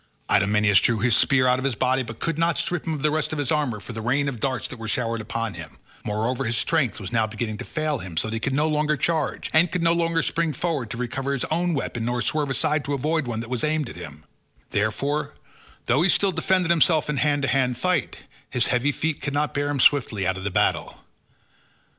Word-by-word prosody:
Idomeneus 105 Hz, -1 st, +4 dB
drew 115 Hz, -, +1 dB
his 115 Hz, +1 st, +3 dB
spear 130 Hz, -2 st, +3 dB
out 125 Hz, 0 st, +3 dB
of -, -, -4 dB
the 135 Hz, -5 st, -1 dB
body, 130 Hz, +1 st, +2 dB
but 115 Hz, -2 st, -7 dB
could 165 Hz, -2 st, -1 dB
not 165 Hz, -1 st, +2 dB
strip 175 Hz, -4 st, -2 dB
him 160 Hz, -, 0 dB
of 140 Hz, -, -6 dB
the 150 Hz, -, +3 dB
rest 155 Hz, 0 st, 0 dB
of 155 Hz, -, -3 dB
his 145 Hz, -4 st, -1 dB
armour 145 Hz, -8 st, 0 dB
for 115 Hz, -, -8 dB
the 110 Hz, -, -5 dB
rain 135 Hz, +5 st, +1 dB
of 130 Hz, -4 st, -4 dB
darts 130 Hz, -1 st, -1 dB
that 125 Hz, -, -9 dB
were 115 Hz, -, -6 dB
showered 115 Hz, 0 st, -1 dB
upon 115 Hz, 0 st, -3 dB
him: 80 Hz, -1 st, -9 dB, 0.3 s
moreover 115 Hz, +5 st, -1 dB
his 115 Hz, +1 st, 0 dB
strength 150 Hz, -8 st, +1 dB
was 95 Hz, -3 st, -7 dB
now 115 Hz, -2 st, +2 dB
beginning 110 Hz, 0 st, -4 dB
to -, -, -4 dB
fail 155 Hz, -3 st, -2 dB
him 90 Hz, -5 st, -8 dB
so 95 Hz, -, +1 dB
that 110 Hz, -, -4 dB
he 115 Hz, -, -1 dB
could 140 Hz, -, -2 dB
no 150 Hz, +2 st, +2 dB
longer 150 Hz, 0 st, +1 dB
charge, 160 Hz, -3 st, -1 dB
and 165 Hz, +2 st, +4 dB
could 180 Hz, -2 st, -1 dB
neither 165 Hz, -1 st, +2 dB
spring 165 Hz, -2 st, 0 dB
forward 145 Hz, -5 st, -2 dB
to 115 Hz, -, -5 dB
recover 135 Hz, +3 st, -2 dB
his 135 Hz, -, 0 dB
own 170 Hz, +1 st, +1 dB
weapon 120 Hz, -4 st, -3 dB
nor 120 Hz, +1 st, -1 dB
swerve 145 Hz, +3 st, 0 dB
aside 145 Hz, +2 st, +1 dB
to 145 Hz, 0 st, -2 dB
avoid 155 Hz, +1 st, 0 dB
one 115 Hz, -2 st, -2 dB
that 115 Hz, -, -8 dB
was 125 Hz, -, -1 dB
aimed 155 Hz, -3 st, 0 dB
at -, -, -11 dB
him; 75 Hz, -3 st, -9 dB, 0.5 s
therefore, 140 Hz, +8 st, -1 dB, 0.5 s
though 130 Hz, +5 st, +2 dB
he 185 Hz, -, +3 dB
still 195 Hz, +2 st, +3 dB
defended 185 Hz, -1 st, +1 dB
himself 160 Hz, -1 st, +3 dB
in 150 Hz, -1 st, -2 dB
hand 145 Hz, 0 st, +1 dB
to -, -, +2 dB
hand 125 Hz, -1 st, +1 dB
fight, 180 Hz, 0 st, -1 dB, 0.3 s
his 125 Hz, -2 st, +1 dB
heavy 125 Hz, +4 st, +2 dB
feet 160 Hz, +1 st, -2 dB
could 140 Hz, 0 st, -3 dB
not 150 Hz, +1 st, 0 dB
bear 145 Hz, 0 st, -1 dB
him 145 Hz, -1 st, -1 dB
swiftly 120 Hz, -8 st, +3 dB
out 95 Hz, 0 st, +1 dB
of 95 Hz, -, -7 dB
the 105 Hz, -, -1 dB
battle. -, -, 0 dB
135 Hz, 245 wpm, -24 LUFS, 115-155 Hz, 0.5 s, Idomeneus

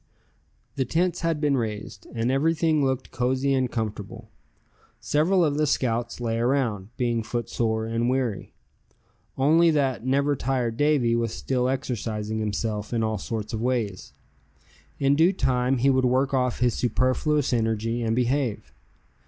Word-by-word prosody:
The 135 Hz, -, +2 dB
tents 175 Hz, +7 st, 0 dB
had 165 Hz, -2 st, 0 dB
been 145 Hz, -2 st, +2 dB
raised, 105 Hz, -6 st, -4 dB
and 115 Hz, +2 st, 0 dB
everything 155 Hz, +2 st, +2 dB
looked 130 Hz, -1 st, -1 dB
cozy 130 Hz, +3 st, 0 dB
and 130 Hz, -2 st, +1 dB
comfortable. 110 Hz, 0 st, -5 dB, 0.7 s
Several 170 Hz, +4 st, +2 dB
of 145 Hz, -1 st, 0 dB
the 155 Hz, -, +2 dB
scouts 120 Hz, -3 st, -1 dB
lay 115 Hz, -1 st, -1 dB
around, 120 Hz, -6 st, 0 dB
being 120 Hz, -2 st, 0 dB
footsore 110 Hz, -1 st, -2 dB
and 115 Hz, +2 st, 0 dB
weary; 125 Hz, -5 st, -1 dB, 0.9 s
only 160 Hz, +5 st, +4 dB
that 140 Hz, -6 st, +1 dB
never 140 Hz, +3 st, +1 dB
tired 125 Hz, -3 st, -1 dB
Davy 140 Hz, -4 st, +2 dB
was 115 Hz, -1 st, 0 dB
still 125 Hz, -1 st, -1 dB
exercising 110 Hz, -5 st, -3 dB
himself 105 Hz, 0 st, -3 dB
in 115 Hz, -1 st, +1 dB
all 110 Hz, -2 st, -1 dB
sorts 110 Hz, +1 st, -5 dB
of 110 Hz, -, -2 dB
ways. 115 Hz, -6 st, -2 dB, 0.9 s
In 140 Hz, 0 st, +3 dB
due 165 Hz, +5 st, +5 dB
time 130 Hz, -5 st, +1 dB
he 135 Hz, +3 st, +3 dB
would 130 Hz, -1 st, +2 dB
work 130 Hz, +3 st, +1 dB
off 125 Hz, -2 st, 0 dB
his 120 Hz, -2 st, +3 dB
superfluous 130 Hz, +5 st, +1 dB
energy, 115 Hz, 0 st, 0 dB
and 115 Hz, -1 st, 0 dB
behave. 125 Hz, -1 st, -1 dB
125 Hz, 145 wpm, -25 LUFS, 115-140 Hz, 0.9 s, due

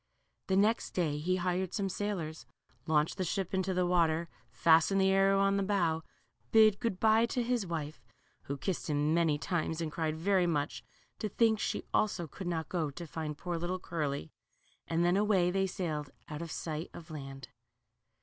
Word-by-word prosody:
The 190 Hz, -, +2 dB
next 215 Hz, +3 st, +2 dB
day 155 Hz, -5 st, 0 dB
he 180 Hz, +4 st, +1 dB
hired 185 Hz, 0 st, -1 dB
some 200 Hz, -2 st, 0 dB
sailors, 185 Hz, -5 st, -4 dB, 0.4 s
launched 155 Hz, +2 st, +2 dB
the 190 Hz, -, 0 dB
ship 185 Hz, +1 st, -2 dB
into 190 Hz, 0 st, 0 dB
the 180 Hz, -1 st, +1 dB
water, 170 Hz, -2 st, +2 dB, 0.2 s
fastened 165 Hz, +4 st, +4 dB
the 190 Hz, 0 st, +4 dB
arrow 195 Hz, 0 st, +4 dB
on 195 Hz, 0 st, +3 dB
the -, -, +1 dB
bow, 175 Hz, -5 st, +1 dB, 0.5 s
bid 215 Hz, -2 st, +6 dB
good 225 Hz, -6 st, -2 dB
by 220 Hz, +2 st, +4 dB
to 245 Hz, +1 st, -1 dB
his 235 Hz, -4 st, 0 dB
wife, 155 Hz, -5 st, -5 dB, 0.4 s
who 140 Hz, -, -3 dB
kissed 175 Hz, +3 st, -3 dB
him 150 Hz, +1 st, +1 dB
many 165 Hz, -3 st, +3 dB
times 160 Hz, 0 st, -2 dB
and 160 Hz, -2 st, -2 dB
cried 160 Hz, -1 st, -2 dB
very 185 Hz, +1 st, +2 dB
much 150 Hz, -3 st, -1 dB, 0.4 s
to 215 Hz, -, -2 dB
think 220 Hz, +1 st, +3 dB
she -, -, -2 dB
also 195 Hz, -5 st, +1 dB
could 175 Hz, +5 st, -8 dB
not 160 Hz, -3 st, -2 dB
go 165 Hz, -5 st, -1 dB
to 170 Hz, +5 st, -8 dB
find 155 Hz, -1 st, -5 dB
poor 175 Hz, 0 st, -3 dB
little 175 Hz, +2 st, -2 dB
Curly, 145 Hz, -, -3 dB, 0.6 s
and 165 Hz, +1 st, +1 dB
then 175 Hz, +2 st, +3 dB
away 200 Hz, -4 st, +3 dB
they 195 Hz, +1 st, +1 dB
sailed 160 Hz, -6 st, -3 dB, 0.2 s
out 150 Hz, +1 st, -6 dB
of 170 Hz, -, -5 dB
sight 155 Hz, +1 st, -4 dB
of 165 Hz, -1 st, -10 dB
land. 135 Hz, -3 st, -8 dB
175 Hz, 185 wpm, -32 LUFS, 160-195 Hz, 0.6 s, bid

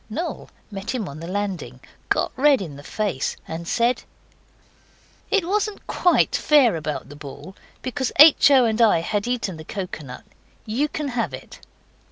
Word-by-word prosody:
Noel 320 Hz, +11 st, -5 dB, 0.2 s
met 200 Hz, +5 st, -4 dB
him 220 Hz, -6 st, -3 dB
on 140 Hz, +2 st, -8 dB
the 165 Hz, -, -7 dB
landing, 185 Hz, -10 st, -4 dB, 0.3 s
got -, -, +1 dB
red 275 Hz, +1 st, +4 dB
in 160 Hz, -7 st, -7 dB
the 140 Hz, -, -10 dB
face, 190 Hz, -3 st, -2 dB
and 165 Hz, +1 st, -6 dB
said 235 Hz, +5 st, +1 dB, 1.3 s
'It 390 Hz, -5 st, +1 dB
wasn't 415 Hz, +1 st, -1 dB
QUITE 355 Hz, -, +2 dB
fair 275 Hz, -, +4 dB
about 155 Hz, -3 st, -4 dB
the 145 Hz, -, -10 dB
ball, 145 Hz, +5 st, -10 dB, 0.3 s
because 260 Hz, 0 st, -2 dB
H. 300 Hz, 0 st, +8 dB
O. 265 Hz, -3 st, +6 dB
and 225 Hz, 0 st, 0 dB
I 210 Hz, -7 st, +5 dB
had 205 Hz, +5 st, -2 dB
eaten 235 Hz, -8 st, -2 dB
the 155 Hz, -, -9 dB
coconut. 155 Hz, -, -7 dB, 0.4 s
YOU 245 Hz, +8 st, 0 dB
can 300 Hz, -2 st, -4 dB
have 240 Hz, -2 st, -2 dB
it. -, -, -13 dB
215 Hz, 165 wpm, -23 LUFS, 165-265 Hz, 1.3 s, H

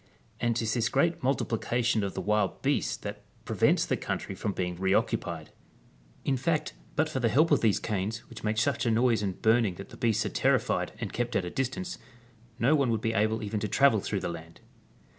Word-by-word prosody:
And 120 Hz, -1 st, +1 dB
'tis 110 Hz, -1 st, 0 dB
this 115 Hz, -2 st, +1 dB
great 165 Hz, +5 st, +1 dB
multiplication 120 Hz, -3 st, 0 dB
of 100 Hz, -, -3 dB
the -, -, -2 dB
wild 105 Hz, -3 st, 0 dB
beasts -, -, +1 dB
that -, -, -7 dB, 0.2 s
prevents -, -, +2 dB
the -, -, 0 dB
country -, -, -4 dB
from 105 Hz, -, -2 dB
being 90 Hz, -2 st, -2 dB
reoccupicd. 95 Hz, +2 st, 0 dB, 0.8 s
In 135 Hz, -, +1 dB
fact 155 Hz, +4 st, 0 dB, 0.2 s
but 155 Hz, +2 st, +2 dB
for 155 Hz, -4 st, -3 dB
the 120 Hz, -2 st, +2 dB
help 155 Hz, +9 st, +3 dB
of 145 Hz, -, +4 dB
these 110 Hz, -4 st, +3 dB
canes, 110 Hz, +2 st, -3 dB
which 115 Hz, -, -11 dB
make 110 Hz, 0 st, 0 dB
such 110 Hz, +2 st, +1 dB
a -, -, +4 dB
noise 115 Hz, -1 st, +3 dB
in 100 Hz, -2 st, -1 dB
burning 110 Hz, -2 st, +2 dB
that 95 Hz, -, -9 dB
the -, -, -12 dB
beasts 110 Hz, -2 st, +1 dB
are -, -, -1 dB
terrified -, -, +1 dB
and -, -, -4 dB
kept 120 Hz, 0 st, -2 dB
at 90 Hz, -, +1 dB
a 90 Hz, -, -5 dB
distance, 135 Hz, +8 st, -3 dB, 0.6 s
no 125 Hz, +5 st, +3 dB
one 140 Hz, -5 st, +3 dB
would 115 Hz, -1 st, +1 dB
be 115 Hz, 0 st, 0 dB
able 110 Hz, +1 st, +1 dB
even 105 Hz, 0 st, -2 dB
to 105 Hz, -, -2 dB
travel 115 Hz, +2 st, +4 dB
through 100 Hz, 0 st, -2 dB
the -, -, -2 dB
land. 85 Hz, -1 st, -9 dB
115 Hz, 210 wpm, -29 LUFS, 105-125 Hz, 0.8 s, of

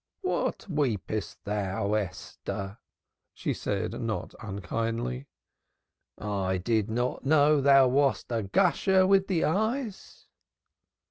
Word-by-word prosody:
"What 370 Hz, -, -1 dB
weepest 115 Hz, -, -2 dB
thou, 100 Hz, 0 st, -1 dB
Esther?" 100 Hz, 0 st, -4 dB, 0.6 s
she -, -, -2 dB
said -, -, -3 dB
not -, -, -3 dB
unkindly. 115 Hz, +6 st, -3 dB, 0.9 s
"I 95 Hz, -3 st, -1 dB
did 110 Hz, +3 st, 0 dB
not 120 Hz, +3 st, -1 dB
know 150 Hz, +1 st, +4 dB
thou 135 Hz, -1 st, +6 dB
wast 135 Hz, 0 st, +1 dB
a 115 Hz, -1 st, 0 dB
gusher 185 Hz, -, +3 dB
with 195 Hz, 0 st, +4 dB
the 175 Hz, -4 st, +1 dB
eyes." 220 Hz, -, -2 dB
125 Hz, 105 wpm, -28 LUFS, 105-155 Hz, 0.9 s, thou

